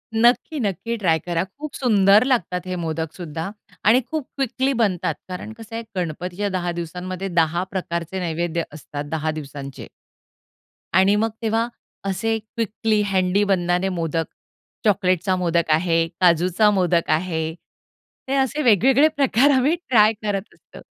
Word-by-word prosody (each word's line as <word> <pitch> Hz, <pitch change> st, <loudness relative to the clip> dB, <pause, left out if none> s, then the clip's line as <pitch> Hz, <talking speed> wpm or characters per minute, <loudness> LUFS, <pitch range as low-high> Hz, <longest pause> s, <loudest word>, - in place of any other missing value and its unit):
नक्की, 240 Hz, +6 st, +3 dB
नक्की 225 Hz, +2 st, -2 dB
ट्राय 165 Hz, -6 st, +2 dB
करा. 170 Hz, +1 st, -1 dB
खूप 285 Hz, +11 st, -9 dB
सुंदर 210 Hz, -3 st, +5 dB
लागतात 185 Hz, -9 st, 0 dB
हे 185 Hz, -, -2 dB
मोदकसुद्धा 160 Hz, +1 st, -4 dB, 0.4 s
आणि 235 Hz, +5 st, +6 dB
खूप 310 Hz, -4 st, -3 dB
क्विकली 270 Hz, 0 st, 0 dB
बनतात. 190 Hz, -9 st, +1 dB
कारण 185 Hz, +4 st, -6 dB
कसं 225 Hz, 0 st, -10 dB
आहे 230 Hz, -, -4 dB
गणपतीच्या 180 Hz, +4 st, -3 dB
10 175 Hz, -1 st, -2 dB
दिवसांमध्ये 180 Hz, +3 st, -5 dB
10 170 Hz, 0 st, +1 dB
प्रकारचे 175 Hz, -1 st, -3 dB
नैवेद्य 170 Hz, -1 st, -1 dB
असतात 145 Hz, -1 st, -7 dB
10 155 Hz, 0 st, -1 dB
दिवसांचे. 140 Hz, -3 st, -8 dB, 1.1 s
आणि 190 Hz, +3 st, +5 dB
मग 225 Hz, +2 st, +1 dB
तेव्हा 225 Hz, +1 st, +1 dB, 0.4 s
असे 210 Hz, +4 st, 0 dB
क्विकली 220 Hz, 0 st, -1 dB
हँडी 190 Hz, 0 st, +2 dB
बननारे 180 Hz, -1 st, +1 dB
मोदक 165 Hz, -2 st, -1 dB, 0.6 s
चॉकलेटचा 185 Hz, -2 st, +2 dB
मोदक 170 Hz, -2 st, 0 dB
आहे, 165 Hz, +1 st, +2 dB
काजूचा 180 Hz, +4 st, +4 dB
मोदक 180 Hz, -3 st, +1 dB
आहे 160 Hz, -1 st, 0 dB, 0.7 s
ते 270 Hz, -, 0 dB
असे 270 Hz, +3 st, +1 dB
वेगवेगळे 255 Hz, -, +5 dB
प्रकार 275 Hz, 0 st, +4 dB
आम्ही 275 Hz, +5 st, +3 dB
ट्राय 225 Hz, -11 st, +3 dB
करत 205 Hz, -1 st, -3 dB
असतो. -, -, -15 dB
185 Hz, 135 wpm, -22 LUFS, 170-225 Hz, 1.1 s, आणि